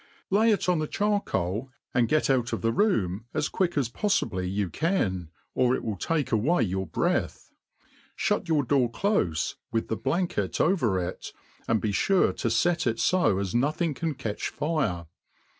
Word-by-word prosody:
Lay 215 +4 +4
it 205 - 0
on 180 -3 +2
the 155 - -1
char*' 205 +3 +1
coal, 100 - -2 0.2
and 120 -2 +3
get 155 - +2
out 125 -3 +1
of - - -2
the 115 - +2
room 115 - +1
as 155 -1 0
quick 175 -4 0
as 135 -5 +2
poifibly 110 - -1
you 100 0 0
can, 95 - -1 0.2
or 125 0 +3
it - - -5
will 110 - -2
take 145 - -1
away 125 +7 +2
your 95 -2 -2
breath. - - -1 0.6
Shut 180 - 0
your 155 -3 +3
door 125 -2 +2
clofe, 115 - 0 0.2
with 115 -1 -1
the 110 - -1
bfankct 120 - -1
over 140 - +2
it, 90 0 -4 0.4
and 115 -1 +2
be 105 - -1
fure 190 - +2
to 115 - 0
fet 160 +7 +1
it 115 -1 0
fo 180 - +3
as 95 -2 -2
nothing 150 +6 +1
can 160 +1 -3
catch 115 -6 -3
fire. 145 - -1
125 Hz, 175 wpm, -27 LUFS, 105-170 Hz, 0.6 s, Lay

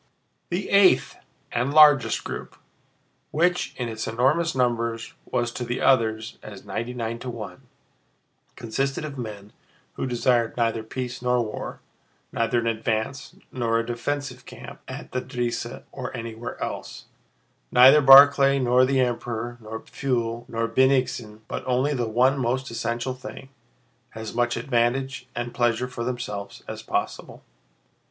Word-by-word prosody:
The 180 +3 -2
eighth 200 -2 +5 0.4
and 125 +3 0
largest 150 -4 +6
group, - - -7 0.7
which 175 +3 +1
in 125 - -2
its 110 -1 -4
enormous 135 +9 +1
numbers 115 -2 -1
was 120 -1 -1
to 125 - -5
the 120 +1 -3
others 110 -3 +1
as 105 -3 -11
ninety 120 +2 -4
nine 115 -1 -3
to 130 - -6
one, 115 -3 -8 0.9
consisted 135 +7 -2
of 140 -3 -7
men 105 -3 -7 0.4
who - - -3
desired 120 -1 +1
neither 115 -1 +1
peace 125 +2 -5
nor 125 -1 +1
war, 105 - -6 0.5
neither 115 +1 0
an 115 - 0
advance 115 +2 -2 0.2
nor 115 -3 0
a 115 - -1
defensive 130 +2 -4
camp - - -11
at - - -8
the 125 - -1
Drissa 120 -2 -4
or 130 -1 -6
anywhere 115 0 -6
else, - - -6 0.7
neither 130 +4 +8
Barclay 140 0 +8
nor 125 -1 +4
the 135 0 +1
Emperor, 120 -1 -2
neither 110 +1 -7
Pfuel 120 -4 -3
nor 115 0 -1
Bennigsen, 125 -3 +1
but - - -5
only 130 +4 +1
the 120 -4 -1
one 130 +5 +3
most 130 +1 -1
essential 115 +2 -2
thing—as 120 -3 -12
much 120 0 0
advantage 125 +2 0
and 120 0 -4
pleasure 120 0 +1
for 125 -2 -5
themselves 105 -5 -5
as - - -6
possible. - - -4
120 Hz, 140 wpm, -25 LUFS, 115-130 Hz, 0.9 s, neither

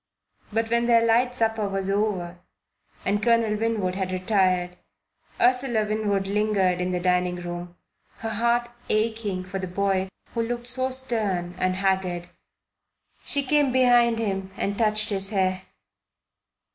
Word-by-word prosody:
But 225 +1 -1
when 235 0 +2
their 230 -1 +5
light 245 +2 +3
supper 220 -3 0
was 195 -1 -2
over 195 -4 -1 0.7
and 205 +1 +1
Colonel 230 -2 +3
Winwood 215 -4 -1
had 190 -1 -2
retired, 185 -2 +1 0.6
Ursula 245 -3 +2
Winwood 210 -2 0
lingered 195 -3 +1
in 180 - -1
the 180 - 0
dining 180 0 +1
room, 175 0 -6 0.4
her 225 0 -4
heart 235 +2 +1 0.2
aching 215 -3 0
for 190 +1 -5
the 185 - -4
boy 190 +1 0 0.2
who 230 - 0
looked 240 +1 -3
so 255 +1 -1
stern 215 -9 -1
and 185 0 +1
haggard. 185 -2 -1 1.0
She 285 -1 +3
came 290 0 +2
behind 245 -2 +4
him 195 -4 -2
and 200 - -1
touched 215 -1 +1
his 195 -1 -2
hair. 185 -2 0
205 Hz, 140 wpm, -25 LUFS, 185-230 Hz, 1.0 s, their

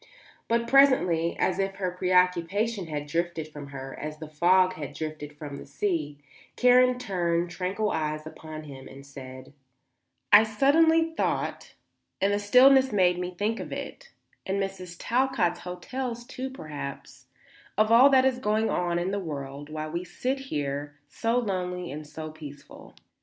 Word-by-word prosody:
But 235 0 +1
presently, 235 -12 +4
as 185 +1 0
if 195 0 -1
her 185 -2 -2
preoccupation 180 +3 +1
had 150 -2 -4
drifted 165 0 -2
from 145 -2 -9
her 135 -1 -8
as 150 0 -5
the 155 0 -8
fog 185 +4 +3
had 150 -6 -7
drifted 155 -2 -6
from 145 -2 -7
the - - -9
sea, 335 - -2 0.4
Karen 250 0 +5
turned 175 -7 -1
tranquil 190 +4 -2
eyes 155 -1 -2
upon 155 0 -9
him 135 -3 -10
and 135 +1 -12
said: 130 -1 -11 0.8
"I 205 - +11
suddenly 320 +9 +3
thought, - - -2 0.4
and 200 +1 +2
the 205 - +1
stillness 260 +5 +6
made 180 -3 +3
me 180 0 -4
think 220 +4 -1
it, - - -7 0.3
and 195 +1 -2
Mrs. 190 -3 -5
Talcott's 235 -9 +1
hotels, 240 +7 -5
too, 260 +2 -5
perhaps, 150 - -8 0.5
of 215 +1 +3
all 250 +4 +8
that 265 -1 +5
is 260 -1 +1
going 215 -1 +1
on 175 -1 0
in 175 +2 -1
the 200 - -1
world 145 -4 -6
while 155 0 -5
we 170 +2 -3
sit 260 +8 -3
here 145 0 -3
so 230 - 0
lonely 180 -5 -2
and 150 +1 -7
so 155 +1 -7
peaceful. 145 -2 -12
180 Hz, 155 wpm, -27 LUFS, 155-230 Hz, 0.8 s, I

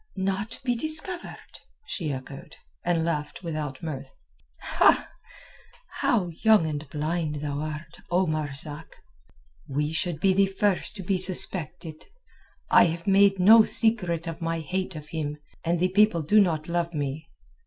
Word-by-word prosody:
"Not 195 +4 -2
be 250 -2 +1
discovered?" 315 +7 -3 0.3
she 165 - -3
echoed, 135 +1 -8 0.3
and 170 -2 +1
laughed 150 +1 -3
without 155 -4 -4
mirth. 135 -4 -5 1.8
"How 200 -7 +1
young 210 +2 +3
and 150 -2 -4
blind 155 +1 -2
thou 145 -1 -3
art, 155 +1 -6
O 180 +2 +2
Marzak! 150 -1 -4 0.7
We 150 +3 -1
should 160 -1 -1
be 190 +3 +3
the 195 +1 +4
first 195 +1 0
to 195 - -6
be 185 +1 0
suspected. 175 -3 -2 0.6
I - - +7
have 170 0 -3
made 195 0 +5
no 215 +5 +8
secret 200 -8 +1
of 165 0 -6
my 165 0 -2
hate 185 +3 -3
of 150 -1 -9
him, 150 -2 -3 0.3
and 170 +1 0
the 185 +1 +2
people 195 -3 +3
do 210 +8 +5
not 160 -5 0
love 170 -1 -1
me. 145 +2 -4
170 Hz, 145 wpm, -26 LUFS, 155-190 Hz, 1.8 s, no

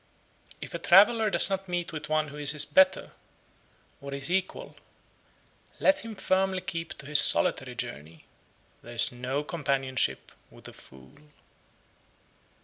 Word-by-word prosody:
61. - - -5
If - - -10
a 170 - -5
traveller 210 +6 +4
does - - +3
not 195 -1 -4
meet 175 -1 -4
with 155 -1 -7
one 155 -1 -1
who 145 - -11
is 145 0 +2
his 150 - +2
better, 285 0 +2 0.9
or 140 0 -9
his 140 +4 -2
equal, 190 - -3 1.0
let 290 +1 +2
him 225 -4 -9
firmly 190 -1 -1
keep 165 -4 -7
to 140 - -10
his 150 +1 +5
solitary - - +3
journey; 75 +2 -9 0.6
there 120 +1 -12
is 115 - +1
no 130 +4 -4
companionship 135 - -2 0.2
with - - -14
a - - -12
fool. 65 - -17
155 Hz, 145 wpm, -27 LUFS, 140-190 Hz, 1.0 s, his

